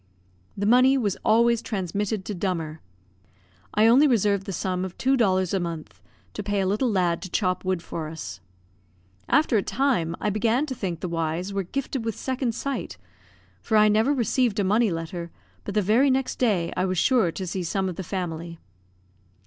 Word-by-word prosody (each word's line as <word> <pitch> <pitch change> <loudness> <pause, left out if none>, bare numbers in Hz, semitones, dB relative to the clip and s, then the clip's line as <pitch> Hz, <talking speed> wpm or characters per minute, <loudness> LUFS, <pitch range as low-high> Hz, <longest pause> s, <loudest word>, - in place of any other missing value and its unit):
The 200 - -1
money 255 +4 +5
was 205 -7 0
always 235 +1 +4
transmitted 200 -1 -3
to 210 - -4
Dummer. 165 -4 -3 0.9
I 210 +1 +5
only 255 +6 +6
reserved 205 -6 +1
the - - -3
sum 185 0 -2
of 185 -1 -6
two 265 +1 +2
dollars 190 -7 +2
a 195 - +2
month, 170 -3 -6 0.3
to - - -4
pay 205 0 -1
a 190 - +1
little 210 +7 +1
lad 180 -5 +1
to 185 - -7
chop 185 -1 0
wood 185 -2 -1
for 160 -2 -5
us. 155 - -7 0.9
After 285 -7 +3
a - - +2
time, 230 -11 0
I 210 - 0
began 230 +7 +1
to 280 - -4
think 180 -8 -4
the - - -2
Y 165 -2 -1
y's 185 +4 -5
were 200 - 0
gifted 260 +5 -4
with 225 -2 -2
secondsight; 260 +1 -3 0.6
for 220 - +1
I 215 0 +6
never 220 +6 +3
received 240 -4 +1
a - - +2
money 215 +4 +3
letter, 170 0 -5 0.4
but 200 - -5
the 210 - +3
very 230 +8 +4
next 265 0 0
day 200 -9 +1
I 185 - 0
was 185 -1 -1
sure 225 -3 +3
to 190 - -4
see 185 +1 -3
some 190 +3 -1
of 180 - -4
the 190 - -5
family. 170 -2 -5
200 Hz, 190 wpm, -25 LUFS, 180-230 Hz, 0.9 s, only